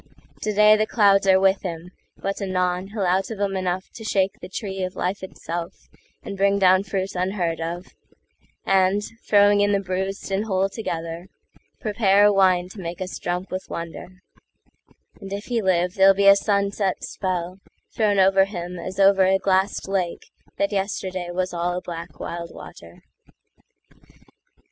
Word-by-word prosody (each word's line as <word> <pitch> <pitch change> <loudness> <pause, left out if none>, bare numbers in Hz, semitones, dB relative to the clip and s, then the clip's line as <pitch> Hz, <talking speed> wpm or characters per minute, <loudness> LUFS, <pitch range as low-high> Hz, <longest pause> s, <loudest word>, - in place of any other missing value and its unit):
Today 210 0 +5
the 215 0 0
clouds 200 -3 +4
are 190 0 +6
with 195 0 +3
him, 175 -1 -6 0.3
but 195 0 -3
anonHe'll 185 +1 -1
out 185 +2 +1
of 220 -3 -6
'em 200 -1 -1
enough 185 0 -2
to 225 - -10
shake 195 -3 0
the - - -8
treeOf 190 -2 -4
life 185 +3 -2
itself 175 -2 -6 0.5
and 200 - -6
bring 200 +1 +2
down 185 -1 +5
fruit 195 -1 -3
unheard 180 -2 -1
of,—And, 185 +3 -3 0.3
throwing 205 0 +5
in 205 0 +2
the 200 - +2
bruised 190 +1 -4
and 195 +3 0
whole 195 -2 0
together, 170 -4 -5 0.5
Prepare 205 -4 +3
a 205 - +5
wine 185 -2 +3
to 200 - -11
make 170 0 -6
us 185 0 -5
drunk 180 +2 -3
with 185 0 -5
wonder; 175 +3 -8 1.0
And 195 - -9
if 200 +1 -5
he 240 -2 -1
live, 180 -2 +1
there'll 195 0 +5
be 200 +1 +1
a 200 0 +9
sunset 200 -1 0
spellThrown 190 +3 -3
over 195 0 +5
him 180 -2 -6
as 185 +3 -6
over 195 -1 +5
a 190 +1 +4
glassed 190 +1 0
lakeThat 195 +1 -3
yesterday 190 -2 -3
was 185 +1 -2
all 175 +1 -1
a - - -1
black 165 -4 -8
wild 170 0 -5
water. 85 0 -13
190 Hz, 155 wpm, -23 LUFS, 180-200 Hz, 1.0 s, a